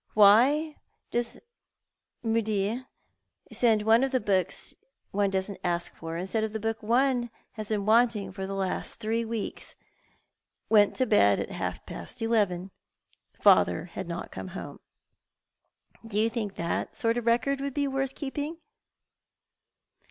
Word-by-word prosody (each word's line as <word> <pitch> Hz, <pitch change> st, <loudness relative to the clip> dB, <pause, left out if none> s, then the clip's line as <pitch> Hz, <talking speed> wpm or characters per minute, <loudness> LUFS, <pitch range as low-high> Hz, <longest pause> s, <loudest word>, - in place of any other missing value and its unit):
Wliy 265 Hz, +10 st, +6 dB, 0.3 s
does 240 Hz, 0 st, -1 dB, 0.8 s
Mudie 225 Hz, +1 st, 0 dB, 0.6 s
send 220 Hz, -3 st, +3 dB
one 225 Hz, +2 st, +5 dB
the 265 Hz, -1 st, +1 dB
books 190 Hz, -5 st, 0 dB, 0.4 s
one 200 Hz, 0 st, +1 dB
doesn't 190 Hz, +1 st, -2 dB
ask 175 Hz, -1 st, -1 dB
for, 165 Hz, 0 st, -6 dB
instead 190 Hz, +5 st, -1 dB
of 220 Hz, -1 st, -3 dB
the 220 Hz, -, -2 dB
book 225 Hz, +1 st, -2 dB
one 240 Hz, +2 st, +2 dB, 0.2 s
has 215 Hz, -2 st, -6 dB
been 210 Hz, -2 st, -1 dB
wanting 220 Hz, -3 st, +3 dB
for 190 Hz, 0 st, -5 dB
the 195 Hz, -, -4 dB
last 190 Hz, -1 st, -2 dB
three 225 Hz, +2 st, -1 dB
weeks? 225 Hz, -2 st, -3 dB, 0.9 s
Went 210 Hz, -2 st, +5 dB
to 255 Hz, -, +2 dB
bed 100 Hz, -, +4 dB
at -, -, -4 dB
half -, -, -4 dB
past -, -, -8 dB
eleven. 200 Hz, -5 st, +1 dB, 0.7 s
Father -, -, +5 dB
had -, -, -5 dB
not -, -, -5 dB
come -, -, -6 dB
home.' -, -, -8 dB, 1.3 s
Do 210 Hz, -2 st, -1 dB
you 225 Hz, +1 st, +2 dB
think 215 Hz, -4 st, -3 dB
that 170 Hz, 0 st, -2 dB
sort 230 Hz, 0 st, +1 dB
of 235 Hz, -, -8 dB
record 270 Hz, +4 st, +2 dB
would 280 Hz, -1 st, -3 dB
be 285 Hz, -1 st, +1 dB
worth 270 Hz, 0 st, -2 dB
keejjing? 295 Hz, +3 st, -4 dB
220 Hz, 140 wpm, -28 LUFS, 200-245 Hz, 1.3 s, Wliy